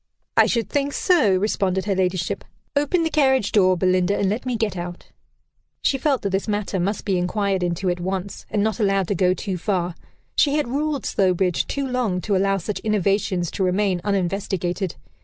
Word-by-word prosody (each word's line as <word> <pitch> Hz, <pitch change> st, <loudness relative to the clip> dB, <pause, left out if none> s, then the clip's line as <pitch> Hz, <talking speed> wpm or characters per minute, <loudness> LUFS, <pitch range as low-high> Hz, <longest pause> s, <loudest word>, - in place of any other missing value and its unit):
"I -, -, +6 dB
should 230 Hz, -2 st, 0 dB
think 285 Hz, 0 st, -1 dB
so," 295 Hz, -, +3 dB
responded 190 Hz, -2 st, 0 dB
her 205 Hz, -, +1 dB
ladyship. 185 Hz, -2 st, -1 dB, 0.3 s
"Open 295 Hz, +5 st, +2 dB
the 320 Hz, -, -1 dB
carriage 265 Hz, -7 st, +3 dB
door, 185 Hz, -3 st, +4 dB
Belinda, 185 Hz, +2 st, +2 dB
and 195 Hz, -, +1 dB
let 230 Hz, +5 st, -2 dB
me 250 Hz, -, 0 dB
get 220 Hz, -4 st, -1 dB
out." 175 Hz, 0 st, -7 dB, 0.7 s
She 270 Hz, -, +2 dB
felt 275 Hz, -2 st, +1 dB
that 200 Hz, -, -1 dB
this 195 Hz, +3 st, -1 dB
matter 205 Hz, -2 st, -1 dB
must 200 Hz, +4 st, -1 dB
be 190 Hz, -3 st, +1 dB
inquired 195 Hz, +1 st, 0 dB
into 175 Hz, +1 st, -1 dB
at 175 Hz, 0 st, 0 dB
once, 190 Hz, +2 st, -4 dB
and 205 Hz, -, 0 dB
not 220 Hz, +1 st, -1 dB
allowed 195 Hz, -4 st, +1 dB
to -, -, +2 dB
go 185 Hz, 0 st, +2 dB
too 190 Hz, -3 st, -4 dB
far. 180 Hz, -2 st, -1 dB, 0.4 s
She 285 Hz, -1 st, +3 dB
had 300 Hz, -4 st, 0 dB
ruled 285 Hz, +2 st, -1 dB
Slowbridge 185 Hz, -2 st, +1 dB
too 280 Hz, -1 st, -2 dB
long 245 Hz, -8 st, 0 dB
to 205 Hz, 0 st, 0 dB
allow 195 Hz, +1 st, +2 dB
such 195 Hz, +3 st, -4 dB
innovations 200 Hz, -4 st, 0 dB
to 195 Hz, -, -2 dB
remain 185 Hz, 0 st, +1 dB
uninvestigated. 190 Hz, -2 st, -1 dB
195 Hz, 190 wpm, -22 LUFS, 185-220 Hz, 0.7 s, I